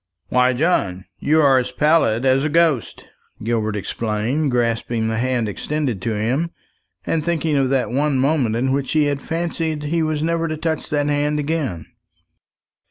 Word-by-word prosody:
"Why, 125 0 +3
John, 110 - 0
you 155 +2 +3
are 135 -3 +5
as 125 0 -3
pallid 135 -5 +2
as 130 +1 +3
a 155 - 0
ghost!" 160 -6 +1 0.4
Gilbert 110 -2 -1
exclaimed, 110 +8 -1
grasping 115 -2 0
the 110 0 -1
hand 125 -2 0
extended 130 0 -3
to 110 +2 -2
him, 125 +11 0 0.6
and 160 -2 0
thinking 160 -2 0
of 135 -2 +2
that 135 -2 0
one 140 +2 +1
moment 130 -4 +1
in 130 +3 0
which 135 -1 -1
he 155 -1 +4
had 145 -1 -1
fancied 165 -2 -2
he 165 +3 0
was 155 -1 -1
never 165 0 0
to 155 -1 -3
touch 160 0 -2
that 145 -1 0
hand 145 +1 0
again. 145 - -2
140 Hz, 165 wpm, -20 LUFS, 120-155 Hz, 0.6 s, are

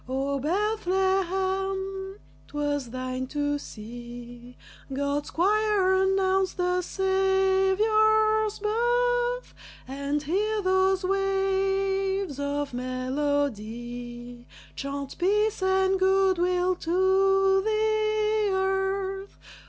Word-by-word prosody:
O 275 +1 -1
Bethlehem, 385 +1 -1 0.3
'twas 290 -3 -2
thine 255 +1 -4
to 290 +1 -1
see 240 +1 -10 0.3
God's 285 +2 -2
choir 405 +1 +2
announce 380 0 +2
the 360 0 0
Saviour's 385 +3 +2
birth, 485 +3 0 0.3
And 280 +2 -3
hear 420 +8 0
those 375 0 +2
waves 390 -2 0
of 285 -1 -2
melody 245 -2 -3 0.3
Chant 275 0 -6
peace 420 +3 +1
and 380 0 +2
good 380 -1 +3
will 360 +1 +1
to 385 +2 +3
the 430 0 +1
earth! 385 0 -2
380 Hz, 80 wpm, -26 LUFS, 285-390 Hz, 0.3 s, good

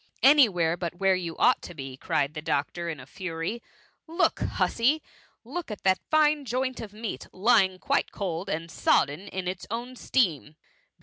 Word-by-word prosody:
" - - -27
Any 285 -6 +6
where 170 -3 +1
but 175 -1 -4
where 190 +1 +3
you 175 -3 -3
ought - - +4
to 175 - -9
be,^ 135 -2 -7
cried 150 -4 0
the 155 - -5
doctor, 165 +3 -2
in 155 -4 -5
a 130 - -10
fury. 180 - -4 0.3
" - - -40
Look, 335 +3 +1
hussy! 275 +7 +1 0.4
look 295 +7 -6
at 210 - -7
that 190 -1 +3
fine 305 -1 +3
joint 255 +1 -2
of 215 -3 -7
meat, 215 +1 -6
lying 190 -2 +3
quite - - 0
cold 185 -1 -4
and 165 -1 -3
sodden 150 +6 +1
in 185 -2 -4
its 180 0 -4
own 240 +3 -4
steam. 165 - 0
190 Hz, 185 wpm, -27 LUFS, 165-235 Hz, 0.4 s, Any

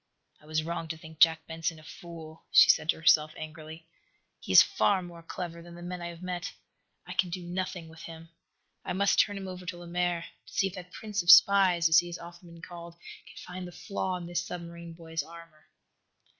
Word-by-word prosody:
"I 150 - -19
was 155 0 0
wrong 165 0 -4
to 160 0 -5
think 160 0 -13
Jack 160 -1 +5
Benson 165 0 -3
a 155 - -15
fool," 160 -1 -11
she - - +9
said 155 - -3
to - - +4
herself, 155 -1 +4
angrily. 155 +1 -9 0.5
"He - - -6
is - - +10
far 195 -3 +1
more 170 -1 -10
clever 170 0 -6
than 170 0 -12
the 175 - -10
men 180 0 -6
I 170 - -4
have 170 +1 -9
met. 180 0 -4 0.5
I 180 - -7
can 185 -1 +1
do 175 +1 -5
nothing 180 -1 -4
with 160 0 -13
him. 165 0 -10 0.5
I - - -3
must 200 +2 +2
turn 205 -1 +3
him 195 -1 -6
over 185 -1 -7
to 180 -1 -4
Lemaire 175 0 -2 0.2
to - - -14
see 195 - +2
if 195 - -3
that 180 -2 -9
prince 210 -1 -3
of 175 - -5
spies, 185 -3 +7
as 160 +1 +7
he 175 - -3
has 175 0 -6
often 175 +1 -12
been 165 0 -14
called, 170 -1 -10 0.3
can - - -15
find 180 0 -7
the - - -10
flaw 190 0 -3
in 175 - -8
this 175 0 -2
submarine 170 -1 -8
boy's 165 -1 -4
armor." 165 0 -14
170 Hz, 220 wpm, -29 LUFS, 165-180 Hz, 0.5 s, is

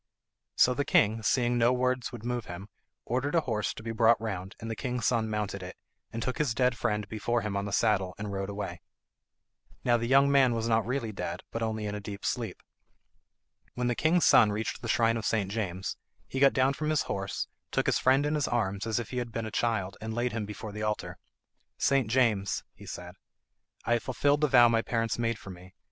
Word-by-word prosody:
So 125 - +5
the 145 - 0
king, 110 -5 +3
seeing 120 +2 +2
no 120 +1 +4
words 125 -1 0
would 120 -2 -9
move 120 -2 -2
him, 90 +4 -8 0.4
ordered 135 +6 -1
a 165 - +4
horse 110 -7 -1
to 110 - -9
be 115 - -3
brought 115 0 +4
round, 100 -4 -5
and 115 - -7
the 115 - -3
king's 125 +1 -3
son 115 -3 +1
mounted 105 -2 -3
it, 90 0 -8 0.3
and 115 0 -4
took 130 - -3
his 140 -6 +1
dead 125 0 +2
friend 105 -3 -1
before 115 +3 -1
him 105 -2 -3
on 100 0 -1
the 100 - -4
saddle, 100 -4 +1
and 100 0 -5
rode 95 0 -3
away. 95 -4 -5 1.0
Now 120 -1 +4
the 115 0 -2
young 135 +2 +5
man 130 -4 +4
was 115 0 -1
not 110 -2 +2
really 125 -3 -2
dead, 90 -3 -5
but 115 - -4
only 110 -1 -2
in 105 - -3
a 105 - -4
deep 100 -1 -7
sleep. - - -3 1.1
When 125 - -1
the 120 - +2
king's 160 +7 +2
son 105 -3 +6
reached 110 +2 -3
the 115 - -5
shrine 115 0 +3
of 110 - -4
St. 100 -4 0
James 95 -4 -3 0.3
he 135 - -4
got 140 0 +6
down 130 +1 +3
from 150 +2 -3
his 155 -1 +2
horse, 100 0 -3 0.2
took - - 0
his - - +2
friend 135 +3 +3
in 150 - 0
his 150 -3 0
arms 105 -3 -1
as 110 - 0
if 120 - -4
he 125 - -4
had 120 -1 -4
been 115 0 -3
a 110 - -5
child, 105 -5 -1
and 110 0 -4
laid 120 +1 0
him 105 -2 -3
before 105 0 -7
the 105 +1 -6
altar. 105 0 -3 0.6
"St. 135 -4 +2
James," 110 -6 +1
he - - -14
said, - - -7 0.7
"I 120 - +2
have 120 - +2
fulfilled 145 +3 +1
the 150 - +4
vow 125 -3 +7
my 115 -1 +2
parents 115 0 -1
made 115 -1 0
for 100 - -10
me. 90 +1 -13
115 Hz, 225 wpm, -29 LUFS, 105-125 Hz, 1.1 s, vow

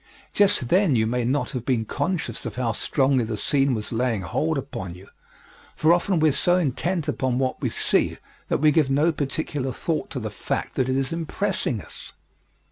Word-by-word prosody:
Just 195 -11 +3
then 185 -6 +4
you 110 -1 +3
may 120 +2 0
not 135 +4 0
have 125 -5 -4
been 120 -3 0
conscious 180 - -2
of 110 - -6
how 120 -2 0
strongly 130 +3 +1
the 110 -1 -3
scene 135 +3 +2
was 105 -1 -4
laying 115 -4 0
hold 155 - -1
upon 95 -10 -5
you, 95 +2 -14 0.7
for 160 +2 +4
often 175 0 +1
we 155 0 +5
are - - +2
so 175 +6 +2
intent 170 +2 -1
upon 130 -2 0
what 130 -1 -1
we - - 0
see - - +1 0.3
that - - +1
we 155 +1 +4
give 150 -3 +3
no 145 +5 +3
particular 145 -2 -2
thought 155 +5 -2
to 135 - -4
the 110 -3 -4
fact - - -3
that 130 0 0
it 130 - +1
is 135 +2 0
impressing 165 - -1
us. - - -12
135 Hz, 200 wpm, -24 LUFS, 120-160 Hz, 0.7 s, we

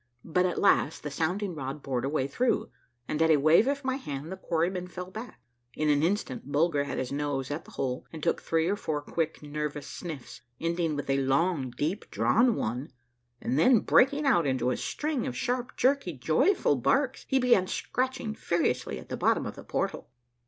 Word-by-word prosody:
But 180 +2 +2
at 180 - -3
last 160 -6 +3
the 150 - -4
sound 165 +8 -1
ing 195 -3 -3
rod 140 -1 -5
bored 130 -2 -1
a - - 0
way 140 -3 0
through, 240 - 0 0.4
and 155 - -1
at 160 - +4
a 155 - +6
wave 155 - +5
of 280 0 -1
my 260 0 0
hand 150 - -6
the - - -3
quarrymen 180 0 -1
fell 180 +1 -7
back. 220 +5 -8 0.4
In 155 0 +1
an 145 -1 +3
instant 160 -6 -1
Bulger 145 -1 +2
had - - -4
his 130 - -3
nose 140 -2 -2
at 145 +3 -4
the - - -14
hole, 130 -1 -2
and 160 -2 -9
took - - +1
three 165 0 +1
or 200 - +1
four 150 -7 -3
quick, 160 0 -2
nervous 150 -1 -4
sniffs, 155 -4 -8 0.2
ending 165 -1 0
with 145 - -4
a 135 0 +2
long, 135 +1 +1
deep 150 - -3
drawn 235 0 +3
one, 125 +7 -3 0.5
and 130 +4 0
then 230 +6 +6
breaking 285 +3 +4
out 175 - +4
into 130 -2 +1
a - - 0
string 300 -4 -2
of 125 - -4
sharp, 245 - -2
jerky, 260 -8 +2
joyful 155 - +2
barks, 265 - +1
he 265 - +2
began 245 -8 +4
scratching 255 0 -2
furiously 170 - -1
at - - -11
the - - -2
bottom - - +2
of - - -5
the - - -10
portal. - - -3
160 Hz, 200 wpm, -28 LUFS, 140-205 Hz, 0.5 s, a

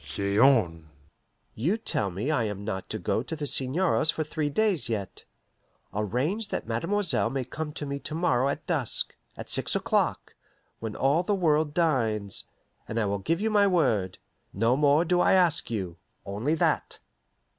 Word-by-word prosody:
"Say 100 0 -3
on." 90 - +3 0.6
"You 165 - 0
tell 110 - -1
me 100 - -3
I 120 -7 +1
am 100 -1 -5
not 95 -3 -4
to - - -3
go - - -1
to 130 +6 -5
the 150 -1 -4
seigneur's 155 +5 +2
for 160 -1 +1
three 155 -1 -2
days 185 - +1
yet. 100 -4 -4 0.7
Arrange 125 - -1
that - - -4
mademoiselle 160 - 0
may 135 -1 -2
come 150 +4 -5
to 150 - -5
me 140 0 -4
to 145 +3 -5
morrow 135 -6 +1
at 140 +2 -4
dusk 145 -10 0 0.2
at - - -7
six - - +2
o'clock, - - -1 0.4
when 110 -2 -5
all 140 +5 +2
the 200 +3 0
world 155 -4 +1
dines 115 - 0 0.4
and 110 - -2
I 110 - +1
will 100 0 -1
give 165 - -1
my 210 -2 +3
word. 115 - +1 0.4
No 115 +5 +2
more 145 +3 +3
do 175 +1 +2
I - - +4
ask 175 -5 +3
you 95 -7 -4 0.3
only 110 +11 -1
that." - - 0
140 Hz, 170 wpm, -27 LUFS, 110-165 Hz, 0.7 s, I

